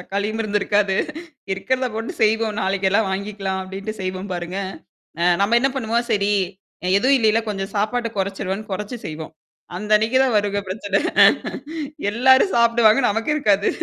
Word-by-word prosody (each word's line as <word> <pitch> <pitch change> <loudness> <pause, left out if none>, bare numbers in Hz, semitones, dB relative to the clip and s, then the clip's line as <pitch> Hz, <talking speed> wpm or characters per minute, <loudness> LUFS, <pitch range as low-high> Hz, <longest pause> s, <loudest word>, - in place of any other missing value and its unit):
தக்காளியும் 200 +4 -3
இருந்திருக்காது. 205 -1 +1 0.6
"இருக்கிறத 255 +6 -1
போட்டு 225 +1 -4
செய்வோம் 220 0 +1
நாளைக்கெல்லாம் 195 +2 +1
வாங்கிக்கலாம்." 195 -1 -3
அப்டின்ட்டு 195 +3 -6
செய்வோம் 185 +1 -4
பாருங்க. 175 +2 -5 0.6
அ - - +2 0.2
நம்ம 230 +4 +3
என்ன 270 +2 +2
பண்ணுவோம் 235 -1 -1
சரி 205 0 +1 0.7
எதுவும் 265 +6 +4
இல்லைல்ல 225 -1 +3
கொஞ்சம் 195 0 -4
சாப்பாட்ட 230 +3 0
குறைச்சுருவோன்னு 195 +1 -3
குறைச்சு 210 +5 -5
செய்வோம். 160 +1 -7 0.4
அந்த 210 +2 -6
அன்னைக்கு 225 +4 +1
தான் 250 -5 +1
வருங்க 205 0 0
பிரச்சனை. 200 0 -1 1.1
எல்லாரும் 260 - +4
சாப்டுவாங்க. 235 0 +4
நமக்கு 225 +7 -1
இருக்காது. 205 -8 +2
210 Hz, 135 wpm, -21 LUFS, 195-225 Hz, 1.1 s, எதுவும்